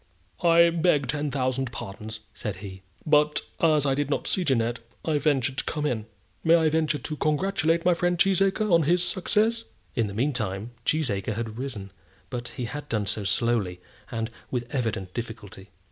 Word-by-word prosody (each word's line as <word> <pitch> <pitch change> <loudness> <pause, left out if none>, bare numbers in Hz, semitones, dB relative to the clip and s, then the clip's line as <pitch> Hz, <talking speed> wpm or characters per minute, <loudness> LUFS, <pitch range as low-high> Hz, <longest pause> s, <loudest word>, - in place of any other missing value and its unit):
"I 170 0 +6
beg 165 -3 +2
ten 150 0 -1
thousand 130 -2 -1
pardons," 110 -1 -7
said 105 -3 -4
he, 95 0 -9 0.2
"but 150 0 +4 0.2
as 155 -3 +4
I 135 - +3
did 145 +1 -1
not 145 - -1
see 185 - +2
Jeannette, 120 -5 +1 0.3
I 155 -2 +2
ventured 135 -4 +1
to - - -1
come 150 -1 -2
in. 115 -6 -1 0.4
May 165 +1 +6
I 160 -2 +4
venture 155 -1 +1
to 155 - -4
congratulate 165 +2 +1
my 180 - +6
friend 175 +1 +1
Cheesacre 195 +3 +3
on 170 -1 +6
his 175 +4 +3
success?" 215 +5 +1 0.3
In 115 -3 +1
the 100 - -7
meantime 115 -4 -1 0.2
Cheesacre 110 -10 0
had 115 0 -4
risen; 110 -8 -5 0.4
but 120 -1 -4
he 120 0 -5
had 145 +5 -6
done 105 -3 0
so 105 +1 -1
slowly, 100 -2 0 0.3
and 115 0 -3 0.2
with 120 -1 -3
evident 110 -8 -2
difficulty. 110 -4 -7
135 Hz, 175 wpm, -26 LUFS, 110-160 Hz, 0.4 s, I